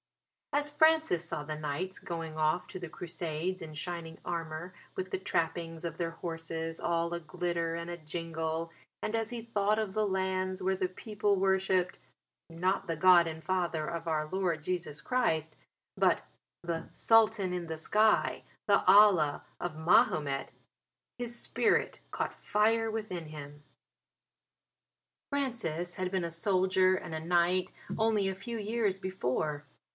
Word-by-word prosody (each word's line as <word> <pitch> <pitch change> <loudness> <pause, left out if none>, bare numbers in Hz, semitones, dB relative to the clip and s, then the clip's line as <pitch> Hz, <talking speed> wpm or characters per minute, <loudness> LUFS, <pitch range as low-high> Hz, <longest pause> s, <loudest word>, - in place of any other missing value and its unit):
As 290 +1 +2
Francis 315 - +4
saw 155 -3 -3
the 155 +1 -4
knights 155 +5 -3
going 165 -2 -5
off 155 +3 +1
to 185 - -6
the 175 -2 -6
Crusades 170 +2 -3
in 160 -2 -7
shining 165 +1 -5
armour 170 +1 -4 0.2
with 185 0 -4
the - - -1
trappings 165 -2 -2
of 165 -1 -4
their 170 -1 -1
horses 165 -1 -4
all 170 0 0
a 170 - -2
glitter 170 +1 -2
and 170 0 -5
a 175 - -3
jingle, 165 0 -3 0.3
and 215 - -1
as 225 -1 -1
he 235 -2 -5
thought 210 -2 +1
of 210 -3 -2
the 215 +1 +1
lands 190 -1 -1
where 190 +1 +1
the 185 -1 -1
people 205 +1 0
worshipped 190 -1 +2 0.5
not 180 +3 0
the 165 -1 -2
God 175 0 +7
and 160 0 -6
Father 175 -4 0
of 170 0 -4
our 155 -1 +1
Lord 175 -3 -1
Jesus 175 -4 -3
Christ 160 -11 0 0.4
but - - +3 0.4
the 170 -1 -3
"Sultan 220 -4 +4
in 175 -2 -3
the 160 0 -4
Sky," 215 +7 +2 0.2
the - - +4
Allah 190 -8 +6
of 175 -3 -4
Mahomet, 150 -4 +3 0.7
his 240 -1 -2
spirit - - +1
caught - - -2
fire 225 +1 +2
within 200 -7 -4
him. 145 -1 -9 1.7
Francis 220 - -2
had 185 -1 -2
been 190 -3 0
a 170 - -4
soldier 185 +1 +3
and 170 - -5
a - - -2
knight 175 +2 +2 0.3
only 220 -3 +2
a 190 - -1
few 230 +5 -5
years 210 -2 0
before. 150 -5 -2
175 Hz, 150 wpm, -31 LUFS, 165-195 Hz, 1.7 s, God